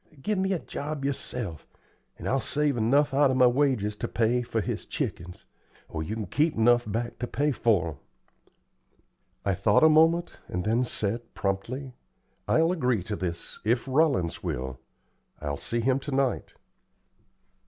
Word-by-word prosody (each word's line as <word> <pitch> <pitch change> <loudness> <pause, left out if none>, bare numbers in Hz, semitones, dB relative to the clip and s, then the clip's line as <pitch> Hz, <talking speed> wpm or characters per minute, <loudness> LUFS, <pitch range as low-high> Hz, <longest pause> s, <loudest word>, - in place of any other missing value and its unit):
Give 205 +8 -1
me 190 +1 +1
a 190 - +2
job 145 -2 -5
yerself, 125 - -4 0.5
and - - -6
I'll 135 - +2
save 145 0 0
enough 135 +5 +3
out 140 0 +5
o' 130 - +1
my 130 -1 +6
wages 125 -5 +2
to - - -3
pay 120 +2 +1
for 115 -2 -2
his 100 - -3
chickens, 90 +1 -4 0.4
or 80 - -4
you 90 +8 -3
kin 110 -2 -3
keep 150 - +1
'nuff 120 -1 +4
back 120 +3 -3
to 120 - -2
pay 145 +4 0
for 105 - +2
'em." 75 - -7 1.5
I 100 - +2
thought 105 - +3
a 160 - +8
moment, 165 +2 +4
and 90 - -3
then 115 +5 +2
said, 115 +1 -3
promptly: 120 +8 -3 0.5
"I'll 165 +2 +3
agree 125 - +1
to 105 +3 -3
this 85 -3 -5
if 115 +3 +1
Rollins 135 - +2
will. 65 +1 -4 0.6
I'll 70 -1 -3
see 120 +9 -2
him 130 +3 +2
to 145 - -6
night." 135 -1 0
120 Hz, 165 wpm, -27 LUFS, 105-140 Hz, 1.5 s, a